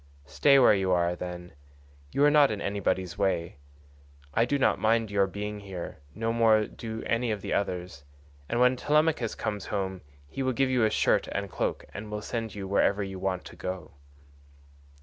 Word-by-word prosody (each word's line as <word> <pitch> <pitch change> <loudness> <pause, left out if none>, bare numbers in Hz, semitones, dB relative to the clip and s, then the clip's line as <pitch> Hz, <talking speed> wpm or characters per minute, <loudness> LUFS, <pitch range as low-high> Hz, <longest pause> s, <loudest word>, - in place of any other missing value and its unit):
Stay 140 - +4
where 130 -5 +7
you 95 -2 +1
are, 85 -1 +2
then; 90 0 -7 0.6
you 145 - +3
are 145 - +6
not 145 -2 +6
in 105 - -3
anybody's 95 -3 -2
way; 85 -5 0 0.8
I 115 - +3
do 140 +3 0
not 135 - +2
mind 110 -1 +2
your 100 -1 +3
being 105 +2 -5
here, 95 -4 -7 0.2
no 115 +2 -1
more 110 -2 +4
do 110 0 -7
any 115 +1 0
of 105 -2 -2
the - - -2
others, 90 -7 -3 0.5
and 120 - 0
when 125 +1 +5
Telemachus 150 -3 +1
comes 105 -2 -4
home 95 -3 -3 0.3
he 135 - -6
will 130 -1 +1
give 130 +1 +1
you 125 -3 +2
a - - +3
shirt - - +2
and 100 -1 -4
cloak - - -2
and 105 +1 -7
will 105 0 -5
send 115 -1 -4
you 100 -2 -5
wherever 100 +1 +2
you 95 -1 -6
want 95 -1 -2
to - - -11
go." 90 -4 -6
105 Hz, 190 wpm, -28 LUFS, 95-115 Hz, 0.8 s, where